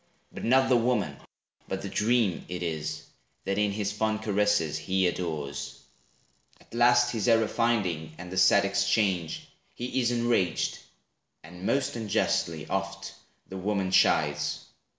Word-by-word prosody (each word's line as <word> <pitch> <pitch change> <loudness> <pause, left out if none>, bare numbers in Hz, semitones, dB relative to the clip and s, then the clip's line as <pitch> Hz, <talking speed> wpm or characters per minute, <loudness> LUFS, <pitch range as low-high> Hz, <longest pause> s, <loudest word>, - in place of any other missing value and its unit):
But - - -8
not 130 +3 +4
the 125 - +4
woman, 120 -3 0 0.5
but - - -4
the - - -4
dream 110 -4 +1
it 90 0 -4
is, 80 -2 -4 0.4
That 100 +1 -1
in 105 0 +2
his 100 0 -2
fond 110 +1 -1
caresses, 105 -6 +1
he 95 +4 0
adores. 80 -5 -3 0.8
At - - -21
last 120 +1 +4
his 110 -2 -2
error 115 -2 +4
finding, 90 -10 -1
and 90 0 -9
the 95 - -5
sad 95 +1 +5
exchange, 100 -4 0 0.3
He 125 +2 -2
is 120 - +2
enraged, 120 -7 0 0.6
and 90 +4 -8
most 140 -2 0
unjustly, 85 -8 -1
oft, 95 -1 -4 0.3
The 95 - -7
woman 95 -1 -1
chides. - - +2
100 Hz, 140 wpm, -28 LUFS, 90-115 Hz, 0.8 s, sad